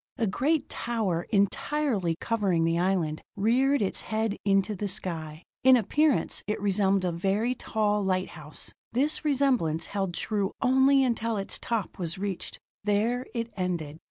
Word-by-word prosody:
A 235 - +1
great 280 - +1
tower, 210 -8 -2
entirely 200 - +1
covering 195 -8 +1
the 165 +1 +1
island, 175 -4 0
reared 245 +5 +3
its 195 - -1
head 220 -1 -1
into 195 +1 +2
the 205 +2 -3
sky. 165 -4 -3 0.2
In 260 0 +8
appearance, 295 +6 +1
it 210 - -1
resembled 195 -1 +2
a 180 - +1
very 195 +8 0
tall 210 -4 0
lighthouse. 185 -5 -3 0.2
This 285 +6 +1
resemblance 255 - +1
held 195 -3 -3
true 205 -3 -1
only 265 +1 +4
until 230 -3 0
its 195 - -4
top 225 -6 -3
was 170 0 -3
reached; 195 -2 -4 0.3
there 220 +5 +1
it 230 0 -3
ended. 170 -5 -3
205 Hz, 145 wpm, -27 LUFS, 185-235 Hz, 0.3 s, In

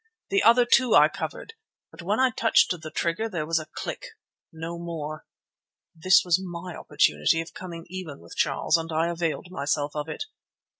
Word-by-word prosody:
The 395 -1 +3
other, 240 +1 +6
too, 245 -1 +4
I - - +7
covered, 450 - -6 0.4
but - - -11
when 200 +7 0
I 260 -1 +4
touched 225 -1 +3
the 160 -3 -4
trigger 170 +8 -1
there 170 -6 -3
was 165 +1 +1
a 155 - -8
click, - - -6 0.4
no 165 +1 -6
more. 155 -3 -6 0.7
This 185 +3 +4
was 175 +1 +3
my 175 -1 -7
opportunity 75 - +2
of 165 - -6
coming 170 -2 -8
even 170 -5 -7
with - - -13
Charles, 140 +4 +2
and 165 0 -5
I 160 +2 +1
availed 170 +1 -3
myself 145 -2 -2
of 150 +1 -3
it. - - -4
170 Hz, 180 wpm, -26 LUFS, 155-185 Hz, 0.7 s, I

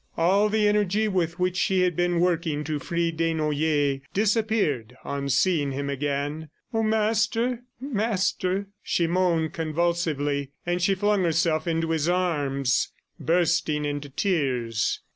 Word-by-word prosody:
All 195 +5 +3
the 210 0 +2
energy 210 +1 +2
with 175 -4 -1
which 180 0 0
she 185 0 +2
had 180 -2 +1
been 175 0 +1
working 165 -4 0
to 150 -1 -2
free 170 +2 -1
Desnoyers 155 -3 0
disappeared 205 - +1
on 140 0 -3
seeing 145 -1 +2
him 140 +1 -3
again. 145 +2 -3 0.2
"Oh, 225 - +1
Master... 225 +2 +1 0.2
Master," 200 -6 -1 0.2
she 170 - 0
moaned 170 -2 +1
convulsively; 155 -4 -1
and 175 +1 -1
she 195 +2 +3
flung 205 0 +1
herself 165 -1 +1
into 165 0 0
his 160 0 +1
arms, 145 -8 0 0.3
bursting 165 -3 +1
into 145 0 -3
tears. 130 - 0
170 Hz, 130 wpm, -25 LUFS, 145-190 Hz, 0.3 s, All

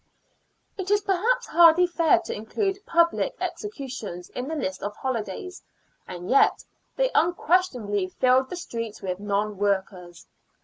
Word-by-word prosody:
It 380 0 -4
is 410 0 +3
perhaps 430 +6 +1
hardly 340 +1 +6
fair 335 -2 +3
to - - -4
include 390 - -3
public 335 0 +2
executions 255 - -6
in 250 +1 -5
the 320 - -3
list 190 -11 -3
of 205 +1 -4
holidays, 260 - -4 0.5
and 180 0 -7
yet 275 - +3 0.3
they - - +1
unquestionably 295 - +1
filled 255 +6 +2
the - - -5
streets 230 - -6
with 185 -1 -3
non 205 0 -2
workers. 190 -3 -2
260 Hz, 135 wpm, -25 LUFS, -, 0.5 s, hardly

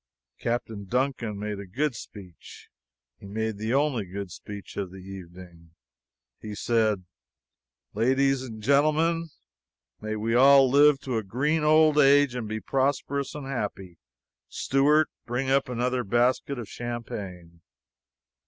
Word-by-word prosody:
Captain 115 -3 -3
Duncan 125 -2 -1
made 105 0 -4
a 100 - -8
good 140 +9 -1
speech; 95 -7 -12 0.5
he 100 - -11
made 110 +1 -3
the 110 +2 -2
only 135 -4 +1
good 95 0 -7
speech 100 +3 -9
of 100 -2 -3
the 95 - -12
evening. 90 -3 -12 0.6
He 105 -1 -7
said: 110 -4 +1 0.9
"LADIES 130 +4 +2
AND 110 -4 -8
GENTLEMEN: 155 +5 +2 0.7
May 110 0 -4
we 110 +2 -1
all 135 +2 +7
live 145 +2 +5
to 125 -4 -2
a 110 - -2
green 145 +10 0
old 155 0 +5
age 140 -2 +5
and 120 -3 -4
be 110 +1 -3
prosperous 140 +3 -1
and 145 -2 -6
happy. 100 -9 -5 0.5
Steward, 145 +3 +2 0.2
bring 130 +3 -1
up 135 -1 +2
another 125 +1 -1
basket 120 +5 +1
of 120 -3 -6
champagne." 100 -8 -7
120 Hz, 135 wpm, -26 LUFS, 100-140 Hz, 0.9 s, all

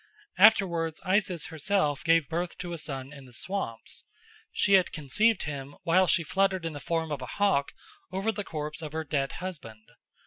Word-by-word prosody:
Afterwards 175 -6 +5
Isis 185 -3 +1
herself 160 -2 0
gave 165 -3 +4
birth 170 +2 -3
to 175 -1 -5
a 170 - -3
son 135 -2 -6
in 140 -2 -11
the 125 - -16
swamps. 120 - -4 0.5
She 200 - +2
had 190 -2 +5
conceived 205 +9 +2
him 140 -1 -6
while 185 +2 +4
she 170 - +3
fluttered 190 +1 +1
in 165 - -2
the 145 - -6
form 160 +1 -2
of 145 - -3
a - - -5
hawk 195 -9 +2 0.4
over 195 +4 0
the 205 -1 -4
corpse 150 -3 -5
of 155 -2 -6
her 160 0 -2
dead 140 -3 -1
husband. 115 -12 -8
165 Hz, 180 wpm, -28 LUFS, 145-190 Hz, 0.5 s, Afterwards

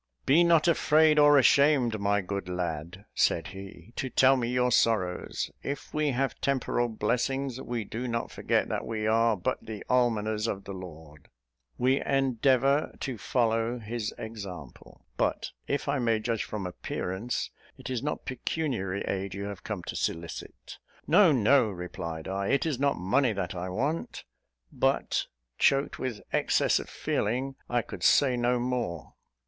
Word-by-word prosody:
"Be 155 +6 +5
not 170 -1 +4
afraid 155 -2 +4
or 145 0 +7
ashamed, 135 -4 +4
my 100 0 +1
good 100 0 -4
lad," 90 +1 -4
said 85 +3 +1
he, 95 +1 -11
"to 130 - -2
tell 130 +1 +5
me 120 -2 -1
your 125 0 +1
sorrows. 105 -7 +1
If 140 +1 -5
we 150 -1 +1
have 135 +1 -1
temporal 125 -3 0
blessings, 125 +4 -1
we 120 -2 -3
do 115 +5 -5
not 115 -1 -2
forget - - 0
that - - -2
we 110 -1 -2
are 115 0 +3
but 90 - -2
the 110 -2 -7
almoners 110 -3 +1
of 100 -3 -3
the 100 - -7
Lord: 80 -5 -11 0.5
we 130 +2 +2
endeavour 135 +1 +2
to 130 -6 -4
follow 115 0 0
his 115 -1 -4
example; 100 - -9
but, - - -1 0.2
if 140 - -1
I 140 0 +1
may 115 -2 +2
judge 115 0 -2
from 105 -3 -5
appearance, 95 +5 -3 0.3
it - - -7
is 125 - -1
not 150 +2 -3
pecuniary 125 - -2
aid 95 0 -3
you 100 - -4
have 100 -2 -6
come 105 -5 -4
to - - -6
solicit." 85 0 -5 0.3
"No, 200 -6 +6
no," 125 -1 +4
replied 85 -3 -6
I; 100 +1 -2
"it 140 - +2
is 150 -6 -1
not 140 0 +2
money 120 +7 +2
that 95 -3 -3
I 90 0 -4
want:" 140 - -2 0.5
but, - - 0 0.3
choked 140 +1 +2
with 125 -5 -4
excess - - +2
of - - -8
feeling, 130 +6 -1 0.2
I 120 -1 +1
could - - -9
say 130 -3 +4
no 120 0 +1
more. 120 - -3
115 Hz, 160 wpm, -28 LUFS, 100-135 Hz, 0.5 s, or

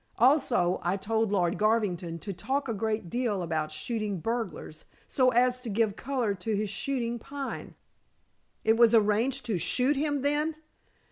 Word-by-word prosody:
Also 240 - +3
I 180 +3 0
told 220 +1 0
Lord 180 -2 +1
Garvington 200 -6 +1
to 200 - -5
talk 270 +11 -2
a 230 - -1
great 215 -2 -2
deal 220 -3 -1
about 155 -2 -1
shooting 210 +4 -3
burglars, 230 +6 -4 0.2
so 255 -3 +3
as 250 +1 +3
to 250 -2 -6
give 210 0 +1
color 245 -5 -1
to 200 +3 -3
his 205 0 -2
shooting 240 0 -2
Pine." 280 +3 -6 0.9
"It 220 +1 +3
was 235 -1 +6
arranged 230 +5 +2
to 215 -7 -1
shoot 255 - +2
him, 290 -1 -1
then?" 300 +2 +1
225 Hz, 155 wpm, -28 LUFS, 200-255 Hz, 0.9 s, was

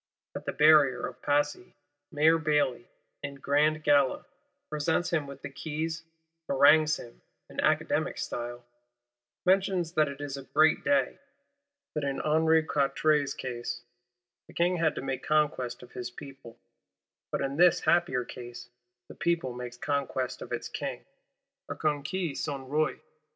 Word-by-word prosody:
At - - -6
the - - +1
Barrier 150 -3 +5
of - - -8
Passy, 145 +5 0 0.4
Mayor 160 +2 +4
Bailly, 145 -6 +1 0.3
in 140 0 -5
grand 150 +3 +1
gala, 145 -3 +3 0.4
presents 155 +3 0
him 155 -4 0
with 140 -1 -10
the - - -5
keys; 160 +3 -4 0.5
harangues 150 +3 +5
him, 120 - -12 0.3
in - - -7
Academic - - +1
style; 120 0 -5 0.8
mentions 185 -2 +2
that 155 -3 +2
it 140 0 -7
is 145 -1 -5
a 135 - -8
great 155 +3 +3
day; 285 -1 +1 0.7
that 150 - -2
in 140 -1 -2
Henri 160 +1 +3
Quatre's 145 -1 +1
case, 120 -2 -5 0.6
the - - -16
King 175 +1 +2
had 165 -2 +1
to - - -5
make 135 -1 -3
conquest 145 -6 0
of 125 - -14
his 125 -1 -5
People, 135 -2 -12 0.7
but - - -1
in 135 +1 -2
this 175 +1 +5
happier 135 -8 +2
case, 120 -1 -9 0.4
the - - -10
People 170 -7 -1
makes 125 0 -7
conquest 135 -2 -2
of - - -8
its - - -3
King - - -5 0.6
(a - - -3
conquis 155 +3 -1
son 140 -3 -4
Roi). 155 +3 0
145 Hz, 145 wpm, -29 LUFS, 135-155 Hz, 0.8 s, Barrier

